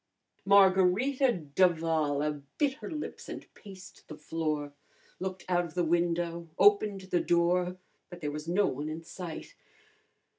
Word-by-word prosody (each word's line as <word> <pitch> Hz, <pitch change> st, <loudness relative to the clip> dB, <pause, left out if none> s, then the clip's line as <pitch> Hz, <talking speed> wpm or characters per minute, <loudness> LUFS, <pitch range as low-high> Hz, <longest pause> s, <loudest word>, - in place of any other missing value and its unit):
Margarita 200 Hz, +7 st, +4 dB
d'Avala 155 Hz, -3 st, +1 dB, 0.2 s
bit 285 Hz, -3 st, +2 dB
her -, -, -6 dB
lips 310 Hz, -3 st, -6 dB
and -, -, -7 dB
paced 190 Hz, -2 st, -13 dB
the 155 Hz, -, -9 dB
floor, 150 Hz, -2 st, -3 dB, 0.5 s
looked 185 Hz, 0 st, -5 dB
out 175 Hz, -1 st, +2 dB
of 170 Hz, -1 st, -9 dB
the 175 Hz, -, +1 dB
window, 170 Hz, 0 st, 0 dB
opened 205 Hz, 0 st, +4 dB
the 185 Hz, -2 st, 0 dB
door, 175 Hz, +1 st, +1 dB, 0.3 s
but 175 Hz, -1 st, -10 dB
there 150 Hz, -3 st, -3 dB
was 150 Hz, +1 st, -6 dB
no 190 Hz, +4 st, +2 dB
one 145 Hz, +4 st, -3 dB
in 160 Hz, +1 st, -6 dB
sight. 170 Hz, -1 st, -8 dB
175 Hz, 140 wpm, -30 LUFS, 160-190 Hz, 0.5 s, Margarita